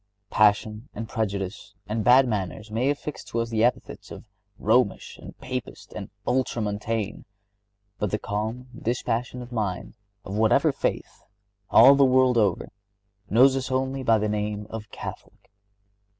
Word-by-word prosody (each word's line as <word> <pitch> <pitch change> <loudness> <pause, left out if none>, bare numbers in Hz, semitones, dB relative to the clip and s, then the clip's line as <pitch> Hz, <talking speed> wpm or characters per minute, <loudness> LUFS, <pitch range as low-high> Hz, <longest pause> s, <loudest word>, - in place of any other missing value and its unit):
Passion 105 +3 +2
and 110 +1 -5
prejudice 100 -2 -4
and 105 +2 -2
bad 130 +3 +6
manners 105 0 -4
may 120 +5 +1
affix 145 +1 -4
to 115 - -3
us 115 0 -2
the 110 -1 +1
epithets 125 +1 -1
of - - -9 0.3
Romish 110 -1 +1
and - - -11
Papist 125 -4 -7
and - - -7 0.2
Ultramontane, 110 -4 -2 0.8
but 105 - 0
the 105 - -1
calm, 110 +5 -4
dispassionate 120 +1 -3
mind, 105 -6 -3 0.3
of 95 - -6
whatever 110 0 +3
faith, - - -3 0.5
all 130 +5 +8
the 140 0 +4
world, 130 -2 +4
over, 100 -5 +1 0.6
knows 130 +5 +5
us 130 -1 -3
only 130 +1 -1
by 115 -3 +3
the 105 0 -1
name 105 0 -2
of 110 -2 -7
Catholic. - - -10
115 Hz, 140 wpm, -25 LUFS, 105-125 Hz, 0.8 s, all